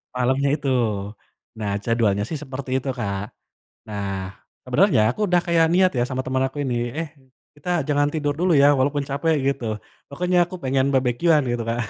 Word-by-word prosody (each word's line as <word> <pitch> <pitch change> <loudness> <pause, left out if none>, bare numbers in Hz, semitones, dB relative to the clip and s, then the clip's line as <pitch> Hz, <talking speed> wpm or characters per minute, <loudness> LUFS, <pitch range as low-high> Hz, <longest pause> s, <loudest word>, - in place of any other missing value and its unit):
Malemnya 130 +3 +1
itu. 145 -2 -3 0.9
Nah 105 -2 -2
jadwalnya 110 -3 +1
sih 160 - -3
seperti 130 -1 -7
itu, 135 - -5
Kak. 100 -3 -2 0.6
Nah, 100 -2 -4 0.3
sebenernya - - +3
aku 215 - -7
udah 175 -1 +3
kayak 170 -1 +4
niat 185 0 +4
ya 120 - +2
sama 130 0 -2
temen 130 0 -1
aku 135 - -12
ini, 125 -2 -1 0.2
"eh 165 -2 -3 0.5
kita 145 +5 -8 0.2
jangan 145 0 +3
tidur 150 -2 0
dulu 180 +1 +2
ya, 140 - +7
walaupun 140 +2 +1
capek," 150 +4 +1
gitu. 135 -3 -1 0.4
"Pokoknya 180 +5 0
aku 185 - -8
pengen 135 0 +1
barbeque-an," 135 +5 +3
gitu 120 -1 -2
Kak, 115 +1 -1
135 Hz, 170 wpm, -23 LUFS, 120-155 Hz, 0.9 s, ya